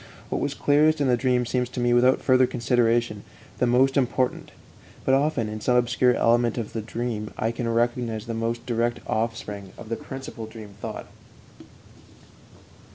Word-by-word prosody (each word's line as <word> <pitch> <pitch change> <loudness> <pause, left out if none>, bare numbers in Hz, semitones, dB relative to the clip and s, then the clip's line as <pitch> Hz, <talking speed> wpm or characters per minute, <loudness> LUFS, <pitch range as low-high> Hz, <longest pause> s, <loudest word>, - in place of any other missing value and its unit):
What - - -2
was 140 0 -2
clearest 150 +2 +3
in 140 - +2
the 125 - +4
dream 125 0 +1
seems 125 0 -1
to 125 - -6
me, 120 0 +2
without 125 +2 +4
further 130 -1 +4
consideration, 120 -3 +1 0.4
the 125 - +3
most 130 +3 +3
important; 130 -1 0 0.5
but 130 - +3
often 135 -4 +2
in 105 0 -6
some 125 - +2
obscure 125 0 +3
element 120 0 +2
of 115 -3 -4
the 110 - -2
dream 115 -1 -4
I 110 - 0
can 115 0 -3
recognize 115 -1 0
the 115 - -4
most 115 +1 -2
direct 120 0 0
offspring 110 -3 -3
of 110 - -10
the 115 - -1
principal 130 -3 -8
dream 110 -2 -10
thought. - - -5
120 Hz, 165 wpm, -25 LUFS, 115-125 Hz, 0.5 s, the